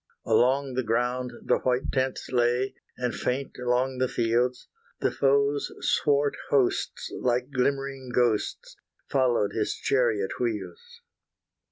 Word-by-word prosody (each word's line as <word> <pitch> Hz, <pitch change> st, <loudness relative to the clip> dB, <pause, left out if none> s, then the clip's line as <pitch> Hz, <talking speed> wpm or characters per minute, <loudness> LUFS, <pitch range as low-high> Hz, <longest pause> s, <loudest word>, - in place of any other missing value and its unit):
Along 130 Hz, +4 st, +2 dB
the 130 Hz, -, 0 dB
ground 125 Hz, +2 st, -1 dB
the -, -, +3 dB
white 125 Hz, +1 st, 0 dB
tents 130 Hz, -1 st, -1 dB
lay; 125 Hz, +1 st, +1 dB, 0.2 s
And 125 Hz, -1 st, -1 dB
faint 130 Hz, +1 st, -3 dB
along 125 Hz, +1 st, 0 dB
the 130 Hz, -, +2 dB
fields. 120 Hz, +1 st, 0 dB, 0.3 s
The -, -, +1 dB
foe's 140 Hz, +1 st, +2 dB
swart 145 Hz, 0 st, +2 dB
hosts, 135 Hz, -3 st, +1 dB
like 125 Hz, +2 st, 0 dB
glimmering 135 Hz, 0 st, -1 dB
ghosts, 120 Hz, -3 st, 0 dB, 0.3 s
Followed 125 Hz, -6 st, +2 dB
his 110 Hz, -, -1 dB
chariot 115 Hz, -7 st, 0 dB
wheels. 470 Hz, -, -4 dB
125 Hz, 120 wpm, -27 LUFS, 120-135 Hz, 0.3 s, the